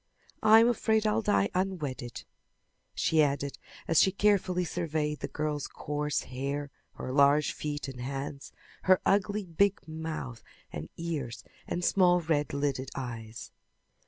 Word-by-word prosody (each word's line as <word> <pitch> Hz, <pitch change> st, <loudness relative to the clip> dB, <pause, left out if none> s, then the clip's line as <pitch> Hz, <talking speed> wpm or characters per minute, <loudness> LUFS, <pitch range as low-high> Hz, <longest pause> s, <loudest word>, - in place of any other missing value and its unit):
I'm 220 Hz, +2 st, +7 dB
afraid 220 Hz, -2 st, +2 dB
I'll 210 Hz, -, +2 dB
die 100 Hz, -2 st, +2 dB
unwedded," 155 Hz, -10 st, -3 dB, 0.7 s
she 160 Hz, -1 st, +3 dB
added 140 Hz, -1 st, 0 dB, 0.3 s
as 165 Hz, -, +5 dB
she 190 Hz, -, +4 dB
carefully 190 Hz, -3 st, +2 dB
surveyed 155 Hz, -3 st, -2 dB
the -, -, -3 dB
girl's 150 Hz, -2 st, -2 dB
coarse 150 Hz, 0 st, -2 dB
hair, 140 Hz, +2 st, -4 dB, 0.2 s
her 130 Hz, -, -5 dB
large 140 Hz, +2 st, +4 dB
feet 145 Hz, -1 st, -4 dB
and 130 Hz, -2 st, -8 dB
hands, 140 Hz, +2 st, -5 dB, 0.3 s
her 185 Hz, 0 st, +6 dB
ugly 205 Hz, +1 st, +2 dB
big 195 Hz, +3 st, +2 dB
mouth 155 Hz, -7 st, -5 dB, 0.3 s
and 75 Hz, -, -6 dB
ears 150 Hz, -8 st, -4 dB, 0.2 s
and 175 Hz, 0 st, -2 dB
small 180 Hz, -2 st, +4 dB
red 155 Hz, -3 st, 0 dB
lidded 140 Hz, -2 st, -1 dB
eyes. 115 Hz, -4 st, -6 dB
150 Hz, 130 wpm, -29 LUFS, 140-180 Hz, 0.7 s, I'm